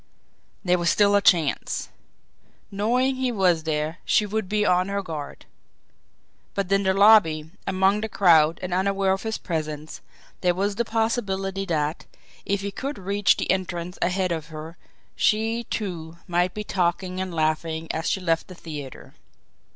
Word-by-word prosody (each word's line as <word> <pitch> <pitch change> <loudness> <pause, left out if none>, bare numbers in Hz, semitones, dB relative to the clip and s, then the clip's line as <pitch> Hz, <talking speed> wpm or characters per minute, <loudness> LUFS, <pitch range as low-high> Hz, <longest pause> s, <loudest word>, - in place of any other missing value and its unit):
There 180 0 +3
was 170 0 +2
still 205 -1 +4
a 200 - +4
chance. 165 -7 +2 0.8
Knowing 250 +6 +1
he 260 -1 0
was 180 -7 +2
there, 155 +2 -2
she 210 - +2
would 210 -1 -3
be 210 0 +1
on 180 0 +3
her 200 0 -2
guard; 155 -5 -7 1.1
but 195 -1 -2
in 195 0 +4
the 190 -1 +2
lobby, 190 -7 +5 0.2
among 195 +2 +2
the 220 - -3
crowd 165 -6 +4
and 180 -1 -3
unaware 195 +1 +1
of 190 - 0
his 220 -1 -3
presence, 155 -3 -5 0.4
there 180 -1 +1
was 200 +2 0
the 235 - 0
possibility 195 -4 -1
that, 155 -3 -2 0.4
if 200 0 0
he 200 0 -4
could 275 +7 -5
reach 200 +1 +2
the - - 0
entrance 180 -1 -3
ahead 185 0 0
of 160 -3 -3
her, 160 +1 -8 0.4
she, 225 +2 +1
too, 170 -6 -5
might 175 0 0
be 210 - -3
talking 185 -1 -1
and 190 -1 -4
laughing 160 0 -1
as 160 +1 -2
she - - 0
left 165 -3 0
the 185 - -11
theatre. 145 -6 -9
185 Hz, 160 wpm, -24 LUFS, 165-200 Hz, 1.1 s, lobby